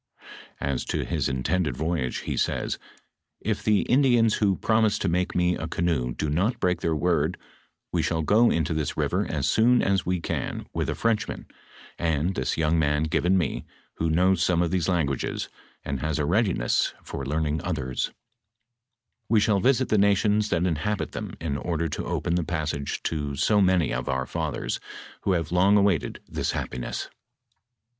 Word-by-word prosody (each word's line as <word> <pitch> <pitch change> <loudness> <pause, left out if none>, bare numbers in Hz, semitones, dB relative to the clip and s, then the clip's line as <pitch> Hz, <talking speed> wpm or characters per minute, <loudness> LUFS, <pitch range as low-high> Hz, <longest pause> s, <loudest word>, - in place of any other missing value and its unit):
As 70 -3 -1
to - - -2
his - - -1
intended 70 +2 -1
voyage, 80 -6 -1
he - - -3
says, - - -1 0.3
" - - -58
If - - -2
the 105 -2 +3
In 130 +3 +3
dians 120 -5 +3
who 100 -3 +3
promise 110 0 +2
to - - -1
make 90 +2 0
me 90 0 +3
a 80 - -4
canoe 80 -8 -1
do 75 - -2
not 90 - 0
break 90 -1 +1
their 80 -1 0
word, 85 +2 +1 0.5
we - - +1
shall 80 -1 0
go 110 +8 +5
into 80 -1 0
this 80 -1 -2
river - - 0
as - - -1
soon 120 +2 +4
as 95 -2 +2
we 90 0 -1
can - - -3
with - - -1
a - - -1
Frenchman 115 -2 -1 0.5
and 80 +2 0
this 65 -7 -2
young 80 +1 +2
man 75 0 +2
given 85 +4 +2
me, 85 -7 -1 0.3
who 80 - 0
knows 90 +2 +3
some 90 -1 +3
of 85 - -1
these 90 -1 0
languages, 75 -7 -1 0.4
and 70 -2 -2
has 75 +2 -1
a 75 - 0
readiness 90 - +1
for 70 - -6
learning 75 +2 -1
othere; 70 -8 -3 1.4
we 110 -1 +5
shall 105 -1 +3
visit 130 +4 +2
the 105 - +3
nations 105 +1 +3
that 85 0 +1
inhabit 90 +5 -1
them - - -6
in 75 -4 -2
order 85 +1 -1
to 75 - -4
open 85 - -1
the 90 0 +1
passage 75 -4 -3
to 75 -3 -2
so 105 +8 +3
many 90 -8 +3
of - - -3
our 65 0 0
fathers, - - -3 0.5
who 95 - +3
have 85 -3 -1
long 95 +3 +4
awaited 100 -5 +1
this - - -2
happiness. 65 -1 -4
85 Hz, 180 wpm, -26 LUFS, 75-95 Hz, 1.4 s, go